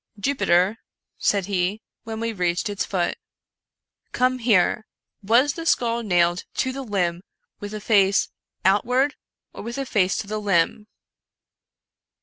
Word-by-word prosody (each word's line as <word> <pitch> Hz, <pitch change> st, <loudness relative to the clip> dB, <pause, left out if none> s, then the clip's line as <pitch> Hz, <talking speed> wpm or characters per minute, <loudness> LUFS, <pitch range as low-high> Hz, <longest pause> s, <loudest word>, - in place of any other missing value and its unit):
" 215 Hz, -, -20 dB
Jupiter," 200 Hz, -4 st, +2 dB, 0.4 s
said 200 Hz, -3 st, +1 dB
he, 195 Hz, +1 st, -1 dB, 0.3 s
when 220 Hz, 0 st, -5 dB
we 230 Hz, 0 st, -2 dB
reached 180 Hz, 0 st, -1 dB
its 200 Hz, -, -2 dB
foot, 175 Hz, -3 st, -2 dB, 0.5 s
" -, -, -56 dB
come 255 Hz, 0 st, +2 dB
here! 220 Hz, -2 st, +2 dB, 0.3 s
was 240 Hz, +8 st, +3 dB
the 330 Hz, -, -6 dB
skull 235 Hz, -7 st, +1 dB
nailed 175 Hz, -4 st, +2 dB
to 260 Hz, -, 0 dB
the 270 Hz, +1 st, -5 dB
limb 180 Hz, -7 st, -1 dB, 0.4 s
with 205 Hz, -, -6 dB
the 215 Hz, 0 st, -6 dB
face 200 Hz, -2 st, +3 dB, 0.4 s
out 195 Hz, +2 st, +4 dB
ward, 260 Hz, +4 st, +1 dB, 0.4 s
or -, -, -8 dB
with 235 Hz, +3 st, -6 dB
the 275 Hz, -, -3 dB
face 190 Hz, -6 st, +1 dB
to -, -, -3 dB
the 215 Hz, +1 st, -3 dB
limb 200 Hz, +1 st, +1 dB
210 Hz, 150 wpm, -23 LUFS, 185-235 Hz, 0.5 s, out